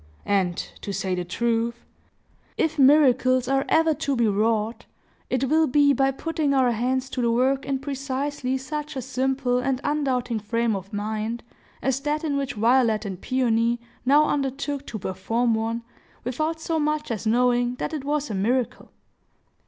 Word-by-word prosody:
And, 190 Hz, -3 st, +1 dB, 0.3 s
to 200 Hz, -, -4 dB
say 190 Hz, -1 st, -2 dB
the 180 Hz, 0 st, -1 dB
truth, 230 Hz, +5 st, -1 dB, 0.7 s
if 315 Hz, -1 st, 0 dB
miracles 260 Hz, -2 st, +5 dB
are 270 Hz, 0 st, +1 dB
ever 320 Hz, 0 st, +4 dB
to 280 Hz, -1 st, -1 dB
be 235 Hz, -2 st, +2 dB
wrought, 215 Hz, +2 st, 0 dB, 0.4 s
it 255 Hz, 0 st, 0 dB
will 310 Hz, +4 st, +3 dB
be 285 Hz, +2 st, +4 dB
by 270 Hz, +1 st, +2 dB
putting 300 Hz, +1 st, -1 dB
our 255 Hz, -2 st, +4 dB
hands 255 Hz, +3 st, 0 dB
to 255 Hz, -, -2 dB
the 235 Hz, -, +2 dB
work 260 Hz, +3 st, +1 dB
in 275 Hz, -1 st, 0 dB
precisely 275 Hz, -1 st, -3 dB
such 300 Hz, +3 st, -5 dB
a 260 Hz, -, -2 dB
simple 260 Hz, 0 st, 0 dB
and 255 Hz, 0 st, 0 dB
undoubting 255 Hz, -6 st, 0 dB
frame 230 Hz, +1 st, 0 dB
of 195 Hz, 0 st, -7 dB
mind 215 Hz, +3 st, -3 dB, 0.4 s
as 265 Hz, 0 st, +1 dB
that 300 Hz, +3 st, -2 dB
in 295 Hz, -3 st, -1 dB
which 280 Hz, -1 st, -2 dB
Violet 225 Hz, -1 st, +3 dB
and 190 Hz, -2 st, -6 dB
Peony 235 Hz, -2 st, +1 dB, 0.2 s
now 290 Hz, +4 st, +5 dB
undertook 280 Hz, 0 st, -2 dB
to 225 Hz, -, -5 dB
perform 225 Hz, +5 st, -1 dB
one, 225 Hz, +1 st, -2 dB, 0.4 s
without 310 Hz, +6 st, -2 dB
so 320 Hz, 0 st, -1 dB
much 300 Hz, -2 st, -1 dB
as 220 Hz, -1 st, -3 dB
knowing 245 Hz, +1 st, +2 dB
that 290 Hz, -, -4 dB
it 300 Hz, -4 st, -3 dB
was 290 Hz, -2 st, -1 dB
a -, -, -2 dB
miracle. 235 Hz, +6 st, -1 dB
255 Hz, 165 wpm, -24 LUFS, 230-280 Hz, 0.7 s, miracles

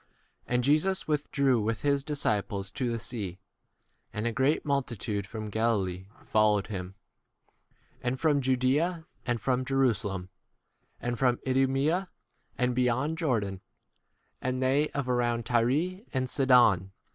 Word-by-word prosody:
7 125 Hz, -, -2 dB
And 125 Hz, -, +2 dB
Jesus 155 Hz, +8 st, +2 dB
withdrew 140 Hz, -5 st, +1 dB
with 110 Hz, +1 st, -2 dB
his 140 Hz, -1 st, +2 dB
disciples 105 Hz, -9 st, -1 dB
to 125 Hz, 0 st, -2 dB
the 115 Hz, -, -1 dB
sea; 110 Hz, -6 st, -4 dB, 0.7 s
and 105 Hz, +1 st, -3 dB
a 120 Hz, -, +1 dB
great 135 Hz, +7 st, +1 dB
multitude 120 Hz, -8 st, -2 dB
from 110 Hz, -2 st, -6 dB
Galilee 95 Hz, -5 st, 0 dB, 0.2 s
followed 105 Hz, -2 st, +3 dB
8 -, -, -11 dB
him; 95 Hz, -1 st, -5 dB, 1.1 s
and 125 Hz, +1 st, -2 dB
from 150 Hz, -3 st, +3 dB
Judea, 135 Hz, +7 st, +1 dB, 0.2 s
and 120 Hz, -1 st, 0 dB
from 130 Hz, +1 st, 0 dB
Jerusalem, 110 Hz, -9 st, 0 dB, 0.7 s
and 120 Hz, -1 st, -3 dB
from 125 Hz, -2 st, +3 dB
Idumea 135 Hz, +8 st, +1 dB, 0.5 s
and 125 Hz, 0 st, +1 dB
beyond 130 Hz, +6 st, 0 dB
Jordan, 105 Hz, -, -1 dB, 0.8 s
and 130 Hz, 0 st, -1 dB
they 135 Hz, +4 st, +2 dB
of 140 Hz, -2 st, -3 dB
around 120 Hz, -2 st, 0 dB
Tyre 140 Hz, -, +1 dB
and 130 Hz, 0 st, +1 dB
Sidon. 120 Hz, -9 st, +4 dB
125 Hz, 135 wpm, -29 LUFS, 110-140 Hz, 1.1 s, Sidon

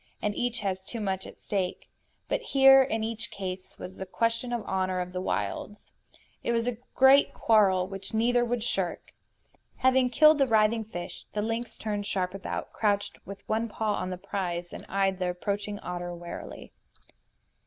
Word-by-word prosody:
And 210 Hz, -, -1 dB
each 240 Hz, +1 st, -1 dB
has 190 Hz, -2 st, -2 dB
too 230 Hz, +4 st, -6 dB
much 190 Hz, -3 st, -2 dB
at -, -, -12 dB
stake. 190 Hz, -3 st, -3 dB, 0.4 s
But -, -, 0 dB
here, 270 Hz, -, +7 dB
in 225 Hz, -4 st, 0 dB
each 225 Hz, 0 st, -3 dB
case, 190 Hz, -1 st, -6 dB
was 185 Hz, -, -9 dB
a 190 Hz, -, -4 dB
question 230 Hz, +4 st, 0 dB
of 240 Hz, -1 st, -1 dB
the -, -, -16 dB
honor 185 Hz, -1 st, 0 dB
of 180 Hz, 0 st, -4 dB
the 185 Hz, -, -2 dB
wilds. 105 Hz, -, -3 dB, 0.6 s
It 235 Hz, -, 0 dB
was 230 Hz, 0 st, +1 dB
a 245 Hz, -2 st, -2 dB, 0.2 s
great 265 Hz, +2 st, +6 dB
quarrel 195 Hz, -5 st, +4 dB
which 195 Hz, 0 st, -4 dB
neither 240 Hz, +2 st, +3 dB
would 240 Hz, -1 st, -1 dB
shirk. 190 Hz, -6 st, -2 dB, 0.6 s
Having 260 Hz, -1 st, +3 dB
killed 305 Hz, +3 st, +6 dB
the 275 Hz, -, +4 dB
writhing 220 Hz, 0 st, +3 dB
fish, 175 Hz, -5 st, -7 dB
the 210 Hz, -, -1 dB
lynx 230 Hz, +2 st, -3 dB
turned 205 Hz, -2 st, -3 dB
sharp 185 Hz, -1 st, -1 dB
about, 195 Hz, -, -5 dB
crouched 205 Hz, -1 st, 0 dB
with 200 Hz, 0 st, -9 dB
one 225 Hz, +1 st, 0 dB
paw 215 Hz, 0 st, -1 dB
on 185 Hz, -, -2 dB
the 185 Hz, -, -4 dB
prize, 175 Hz, -2 st, -3 dB
and -, -, -9 dB
eyed 195 Hz, -1 st, +1 dB
the 180 Hz, -1 st, 0 dB
approaching 205 Hz, +3 st, -3 dB
otter 175 Hz, 0 st, -5 dB
warily. 170 Hz, 0 st, -8 dB
205 Hz, 180 wpm, -28 LUFS, 185-230 Hz, 0.6 s, here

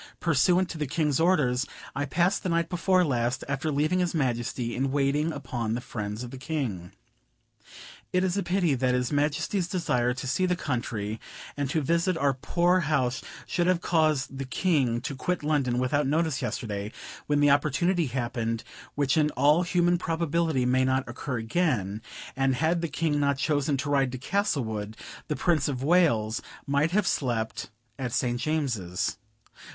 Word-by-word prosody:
Pursuant 175 Hz, +3 st, +3 dB
to 160 Hz, -, -6 dB
the 150 Hz, -, -1 dB
King's 150 Hz, -1 st, 0 dB
orders, 145 Hz, -7 st, +2 dB, 0.3 s
I 145 Hz, -, -1 dB
passed 175 Hz, +7 st, +1 dB
the 185 Hz, -, -2 dB
night 170 Hz, -1 st, +1 dB
before 180 Hz, +1 st, +2 dB
last, 125 Hz, -3 st, 0 dB
after 140 Hz, +3 st, -1 dB
leaving 155 Hz, +6 st, +1 dB
his 175 Hz, -2 st, 0 dB
Majesty, 120 Hz, -3 st, -1 dB
in 135 Hz, +1 st, 0 dB
waiting 145 Hz, +3 st, +1 dB
upon 120 Hz, -6 st, -3 dB
the -, -, -2 dB
friends 105 Hz, -1 st, -5 dB
of 120 Hz, -, -7 dB
the 135 Hz, -, -8 dB
King. 130 Hz, -, -3 dB, 1.2 s
It 180 Hz, 0 st, +2 dB
is 185 Hz, -1 st, 0 dB
a 200 Hz, -, +1 dB
pity 180 Hz, -5 st, +1 dB
that 130 Hz, -1 st, +1 dB
his 125 Hz, -1 st, -1 dB
Majesty's 150 Hz, +6 st, 0 dB
desire 125 Hz, -10 st, 0 dB
to 130 Hz, -, -5 dB
see 185 Hz, +9 st, +1 dB
the 180 Hz, -, +1 dB
country 115 Hz, -7 st, -3 dB, 0.4 s
and 145 Hz, -2 st, -2 dB
to 155 Hz, +3 st, +1 dB
visit 170 Hz, +4 st, +1 dB
our 140 Hz, -3 st, +2 dB
poor 175 Hz, +7 st, +2 dB
house 140 Hz, -6 st, 0 dB, 0.2 s
should 175 Hz, 0 st, 0 dB
have 185 Hz, -1 st, +3 dB
caused 155 Hz, -6 st, +1 dB
the 135 Hz, -, -3 dB
King 130 Hz, -5 st, +1 dB
to 140 Hz, -, -4 dB
quit 180 Hz, +5 st, -2 dB
London 140 Hz, -5 st, +1 dB
without 135 Hz, +3 st, +1 dB
notice 155 Hz, -2 st, +1 dB
yesterday, 105 Hz, -2 st, -3 dB, 0.4 s
when 145 Hz, 0 st, +2 dB
the 145 Hz, -1 st, +5 dB
opportunity 155 Hz, +4 st, +2 dB
happened 120 Hz, -2 st, -2 dB, 0.3 s
which 140 Hz, +1 st, +1 dB
in 150 Hz, -1 st, +3 dB
all 145 Hz, +5 st, +5 dB
human 175 Hz, -1 st, +2 dB
probability 165 Hz, -4 st, 0 dB
may 130 Hz, +1 st, +3 dB
not 130 Hz, 0 st, +1 dB
occur 125 Hz, +2 st, -4 dB
again; 115 Hz, -, 0 dB, 0.3 s
and 135 Hz, -1 st, +2 dB
had 165 Hz, +5 st, +1 dB
the 170 Hz, -, -1 dB
King 155 Hz, -1 st, 0 dB
not 140 Hz, -1 st, +2 dB
chosen 145 Hz, -1 st, +1 dB
to 135 Hz, +2 st, -3 dB
ride 135 Hz, -3 st, +2 dB
to 130 Hz, -, -4 dB
Castlewood, 120 Hz, -, -1 dB, 0.3 s
the 150 Hz, -, -1 dB
Prince 160 Hz, -5 st, +1 dB
of 135 Hz, -3 st, -3 dB
Wales 140 Hz, -10 st, +3 dB, 0.2 s
might 140 Hz, +3 st, +2 dB
have 200 Hz, +3 st, +1 dB
slept 120 Hz, -8 st, -1 dB, 0.3 s
at 125 Hz, -2 st, -2 dB
St. 120 Hz, +1 st, 0 dB
James's." 120 Hz, -, -1 dB
140 Hz, 170 wpm, -27 LUFS, 125-165 Hz, 1.2 s, the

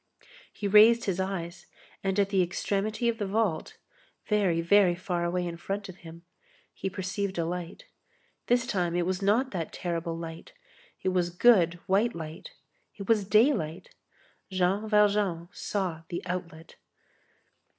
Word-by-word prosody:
He 205 Hz, -, -4 dB
raised 220 Hz, +4 st, +6 dB
his 190 Hz, -2 st, -1 dB
eyes, 190 Hz, -2 st, -4 dB, 0.4 s
and 195 Hz, +1 st, 0 dB
at 200 Hz, -1 st, +2 dB
the 195 Hz, -2 st, +2 dB
extremity 205 Hz, +6 st, -1 dB
of 230 Hz, 0 st, 0 dB
the 205 Hz, -, -1 dB
vault, 200 Hz, -5 st, -1 dB, 0.5 s
far, 210 Hz, -4 st, +2 dB
very 180 Hz, +1 st, +4 dB
far 175 Hz, -1 st, -2 dB
away 175 Hz, +1 st, -1 dB
in 170 Hz, -1 st, -5 dB
front 195 Hz, +3 st, -4 dB
of 185 Hz, -, -10 dB
him, 170 Hz, -1 st, -12 dB, 0.5 s
he 195 Hz, -, -4 dB
perceived 195 Hz, +1 st, -3 dB
a 165 Hz, -, 0 dB
light. 175 Hz, -, -5 dB, 0.6 s
This 245 Hz, +1 st, +3 dB
time 175 Hz, -7 st, -1 dB
it 175 Hz, -1 st, +1 dB
was 185 Hz, +1 st, -2 dB
not 225 Hz, +7 st, +2 dB
that 170 Hz, -4 st, -4 dB
terrible 170 Hz, -1 st, -3 dB
light; 165 Hz, -1 st, -8 dB, 0.5 s
it 185 Hz, -, +2 dB
was 180 Hz, -2 st, +1 dB
good, 175 Hz, -2 st, +4 dB
white 210 Hz, +5 st, +2 dB
light. 160 Hz, -, -7 dB, 0.5 s
It 200 Hz, -2 st, -8 dB
was 215 Hz, -3 st, +3 dB
daylight. 215 Hz, -, +2 dB, 0.6 s
Jean 190 Hz, +3 st, 0 dB
Valjean 205 Hz, -5 st, +2 dB
saw 185 Hz, -7 st, -3 dB
the 175 Hz, -, -5 dB
outlet. 175 Hz, -3 st, -6 dB
190 Hz, 150 wpm, -28 LUFS, 170-205 Hz, 0.6 s, raised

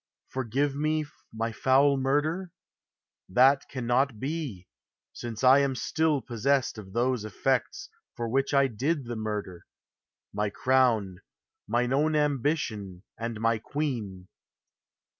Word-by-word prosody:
" -, -, -61 dB
Forgive 130 Hz, +3 st, -1 dB
me 155 Hz, +1 st, 0 dB, 0.3 s
my 115 Hz, +1 st, -2 dB
foul 135 Hz, +5 st, +3 dB
mur 135 Hz, +2 st, +2 dB
der?" 170 Hz, +4 st, -4 dB, 0.8 s
That 135 Hz, +7 st, +4 dB
cannot 125 Hz, -1 st, 0 dB
be: 135 Hz, -, -4 dB, 0.5 s
since 115 Hz, -1 st, -6 dB
I 130 Hz, +2 st, +7 dB
am 140 Hz, -2 st, +1 dB
still 155 Hz, +1 st, 0 dB
possessed 125 Hz, +1 st, 0 dB
Of 95 Hz, -2 st, -11 dB
those 120 Hz, 0 st, +1 dB
effects 135 Hz, -, -1 dB, 0.3 s
for 120 Hz, -2 st, -3 dB
which 135 Hz, +4 st, 0 dB
I 140 Hz, -1 st, +4 dB
did 135 Hz, +4 st, -1 dB
the 120 Hz, 0 st, -5 dB
murder, 105 Hz, -5 st, -5 dB, 0.7 s
My 105 Hz, 0 st, 0 dB
crown, 115 Hz, -6 st, +2 dB, 0.5 s
mine 120 Hz, +3 st, +1 dB
own 155 Hz, +3 st, +2 dB
ambition 135 Hz, -, -1 dB
and 115 Hz, -1 st, -5 dB
my 115 Hz, 0 st, +1 dB
queen. 110 Hz, -10 st, -4 dB
130 Hz, 125 wpm, -28 LUFS, 110-140 Hz, 0.8 s, I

